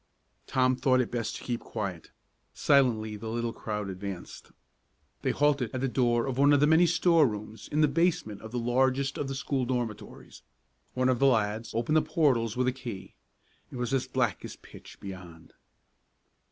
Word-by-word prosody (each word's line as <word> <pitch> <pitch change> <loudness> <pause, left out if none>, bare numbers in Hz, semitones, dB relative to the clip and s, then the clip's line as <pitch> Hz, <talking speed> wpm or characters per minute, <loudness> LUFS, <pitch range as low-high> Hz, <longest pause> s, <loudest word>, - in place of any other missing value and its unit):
Tom 130 -1 +2
thought 130 0 +2
it 125 - -1
best 115 -2 -3
to - - -8
keep 120 -1 -2
quiet. 95 -7 -5 0.5
Silently 115 -7 +2
the 110 +2 -7
little 115 +1 -2
crowd 105 -2 -4
advanced. 95 -1 -7 0.7
They - - 0
halted 145 -4 +2
at 130 - -2
the 135 - +1
door 120 -2 +1
of 135 -1 -3
one 145 +1 +6
of 145 - +5
the 145 - +5
many 160 +3 +5
store 170 -3 +4
rooms 110 0 -7
in 150 - +2
the 150 - +5
basement 155 - 0
of 110 - -8
the 125 - -3
largest 130 +3 +1
of 145 - -2
the 135 - -4
school 135 -1 -1
dormitories. 120 -4 -5 0.5
One 130 0 +2
of 130 -2 +2
the 140 - +5
lads 110 -2 0
opened 120 +7 +1
the - - +5
portals 125 -10 +1
with 125 0 +1
a - - +3
key. 120 -7 -8 0.6
It - - -9
was 125 +1 -2
as 135 -1 0
black 120 -7 -1
as - - -7
pitch - - -15
beyond. 90 -4 -10
125 Hz, 185 wpm, -28 LUFS, 110-135 Hz, 0.7 s, one